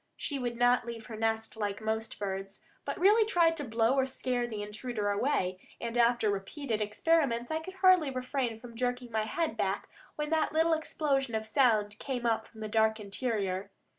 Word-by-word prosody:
She 285 -2 -3
would 240 -2 -3
not 245 0 +3
leave 230 -1 -6
her 225 - -7
nest 225 +1 -1
like 205 -2 -2
most 220 0 -2
birds, 195 0 -4 0.2
but - - -3
really 415 +5 +6
tried 340 -6 +3
to 295 - -2
blow 230 0 +2
or 265 -1 +2
scare 250 -2 -1
the 215 -3 -4
intruder 210 0 -3
away; 200 -5 0 0.2
and 235 0 -4
after 235 -2 +3
repeated 220 +4 -3
experiments 240 +3 +1
I 315 - 0
could 375 +4 -9
hardly 370 -5 +5
refrain 255 -3 -2
from 235 0 -11
jerking 245 0 -2
my 220 -1 0
head 315 +4 -1
back 200 -3 -1 0.3
when 300 0 -3
that 315 -1 +1
little 325 +1 +3
explosion 275 -6 0
of 220 0 -2
sound 215 -3 +2
came 250 -3 -3
up 225 -1 +1
from 220 - -14
the 215 - -3
dark 220 +1 +2
interior. 200 -3 -2
235 Hz, 190 wpm, -31 LUFS, 215-275 Hz, 0.3 s, really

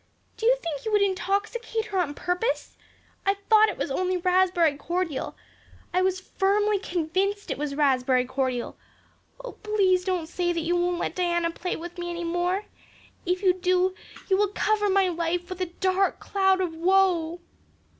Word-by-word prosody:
Do 450 - -1
you - - +6
think 320 - -5
you 440 - -3
would 415 -1 +4
intoxicate 405 +4 -1
her 395 -4 -2
on 295 -5 -1
purpose? 360 +11 -2 0.5
I 395 +1 +2 0.2
thought 435 0 +7
it - - -5
was 275 - -3
only 370 +5 0
raspberry 360 -3 +3
cordial. 335 0 -3 0.6
I 365 - +3
was 375 0 +1
firmly 405 +2 +1
convinced 375 +3 -1
it - - -2
was 290 -1 -3
raspberry 260 -3 +2
cordial. 255 -2 -2 0.7
Oh, - - -5
please 390 -4 +1
don't 365 -3 -1
say 350 +1 -1
that 335 - -1
you 340 +2 0
won't 350 0 +1
let 340 - -2
Diana 345 -2 0
play 360 +2 -4
with 345 +2 -8
me 345 0 -4
any 345 0 -4
more. 355 +4 -1 0.6
If 360 +2 0
you 370 -2 +5
do 365 0 +1 0.3
you 380 - +3
will 415 +1 +3
cover 415 +1 +1
my 385 -1 +3
life 345 0 -2
with 370 0 -5
a 365 - 0
dark 375 +2 0
cloud 385 -1 +2
of 350 -3 -2
woe." 350 -1 +2
365 Hz, 175 wpm, -26 LUFS, 340-390 Hz, 0.7 s, thought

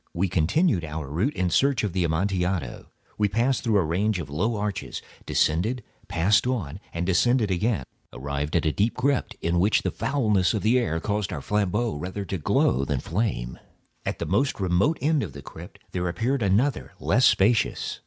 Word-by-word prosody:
We 95 +3 +1
continued 90 - +2
our 80 -2 -5
route 90 - -1
in 90 -1 0
search 140 +6 +2
of 100 -5 -1
the 90 -1 +1
Amontillado. 90 -3 -1 0.3
We 105 -1 +3
passed 120 +6 +1
through 110 -4 +2
a 95 - +3
range 95 +6 0
of 75 -5 -6
low 105 +10 0
arches, 105 -1 -3 0.3
descended, 105 +10 +1 0.2
passed 100 +7 +2
on, 100 - -2
and 85 +1 -3
descending 110 +4 +2
again, 95 - 0 0.3
arrived 70 +2 -4
at 85 - +2
a 80 - +3
deep 105 +8 0
crypt, 135 +1 0
in 85 +1 +1
which 100 +5 +3
the - - 0
foulness 110 -8 +1
of 105 - -2
the 120 +4 +4
air 80 -9 -1
caused 105 +2 -2
our - - -3
flambeaux 105 0 0
rather 95 +6 -5
to 95 -1 -4
glow 70 -2 +2
than 70 -2 -1
flame. 80 - -2 0.4
At - - -3
the - - -3
most 135 -3 0
remote 95 - +2
end 150 0 +2
of 85 - -5
the 70 0 -10
crypt - - -11
there 90 -1 -2
appeared 120 +10 -1
another 110 +8 +1
less - - +3
spacious. 105 +1 +2
95 Hz, 185 wpm, -25 LUFS, 85-115 Hz, 0.4 s, the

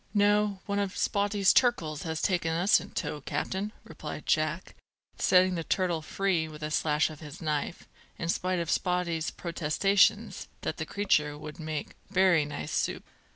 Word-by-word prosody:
"No; 205 -1 +3
one 200 0 -1
of 200 -1 -2
Spottie's 200 -1 +2
turkles 165 - +2
has 160 -2 -3
taken 175 -4 +1
us 175 +5 +4
in - - -9
tow, 150 - -4
captain," 195 +8 -3
replied - - -8
Jack, - - 0 0.5
setting 185 0 +4
the 165 -2 -2
turtle 175 -2 0
free 175 0 0
with 150 -1 -10
a 155 - -3
slash 150 +1 +2
of 155 - -11
his 150 -3 -10
knife, 155 0 -3 0.3
in 165 - -3
spite 185 +2 0
of 170 -1 -1
Spottie's 175 -3 0
protestations 175 +4 +1
that - - -3
the - - -4
creature 150 -8 +1
would 150 +1 -9
make 155 -2 -4 0.2
"bery 185 -5 +4
nice 75 - -5
soup." - - -1
170 Hz, 160 wpm, -29 LUFS, 155-195 Hz, 0.5 s, us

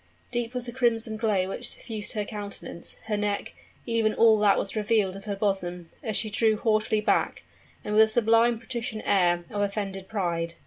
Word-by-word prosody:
Deep 240 0 -2
was 250 -1 -2
the 240 - -5
crimson 230 -3 +1
glow 210 -4 +1
which 240 +5 -3
suffused 215 -1 -4
her 210 -2 -2
countenance 200 -5 -6
her 215 - -1
neck 205 -1 -2 0.3
even 225 -2 +1
all 225 -2 +6
that 205 -1 +4
was 195 - -1
revealed 210 -3 +1
of 195 - -10
her 205 -2 -2
bosom, 180 -4 -2
as 220 -3 -1
she 220 - +1
drew 220 0 +2
haughtily 215 -1 +1
back, - - +1 0.4
and 210 - -3
with 215 - +6
a 220 - +7
sublime 230 +1 +3
patrician 230 -2 -4
air 175 -3 +2
of 205 -2 -2
offended 195 -2 -3
pride. 170 -5 -2
215 Hz, 185 wpm, -27 LUFS, 195-225 Hz, 0.4 s, a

